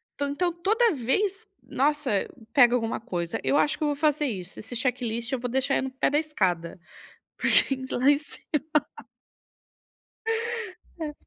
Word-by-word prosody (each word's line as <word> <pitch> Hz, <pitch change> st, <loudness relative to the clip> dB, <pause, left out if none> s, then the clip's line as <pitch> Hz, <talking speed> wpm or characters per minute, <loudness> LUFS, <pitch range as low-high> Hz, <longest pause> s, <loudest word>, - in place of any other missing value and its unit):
então 285 Hz, 0 st, -1 dB
então, 350 Hz, +5 st, 0 dB
toda 430 Hz, +7 st, +2 dB
vez, 390 Hz, -, 0 dB, 0.2 s
nossa, 295 Hz, 0 st, 0 dB, 0.4 s
pega 245 Hz, -4 st, +6 dB
alguma 225 Hz, -2 st, -1 dB
coisa. 175 Hz, -7 st, -3 dB
Eu -, -, +1 dB
acho 295 Hz, -, +2 dB
que -, -, -3 dB
eu -, -, +2 dB
vou 290 Hz, -, 0 dB
fazer 300 Hz, 0 st, +2 dB
isso. 195 Hz, -8 st, -5 dB
Esse 225 Hz, +3 st, -7 dB
checklist 235 Hz, -2 st, -1 dB
eu 265 Hz, -, 0 dB
vou 245 Hz, +1 st, -3 dB
deixar 265 Hz, +2 st, +1 dB
ele -, -, +1 dB
no -, -, -7 dB
pé 265 Hz, -, +1 dB
da 290 Hz, -, +2 dB
escada, 185 Hz, -, -1 dB, 0.6 s
porque -, -, +3 dB
ir 260 Hz, -1 st, -6 dB
lá 255 Hz, +2 st, +1 dB
em 290 Hz, 0 st, +6 dB
cima. 295 Hz, -2 st, -9 dB, 2.6 s
É. 305 Hz, -2 st, -3 dB
270 Hz, 165 wpm, -26 LUFS, 240-300 Hz, 2.6 s, pega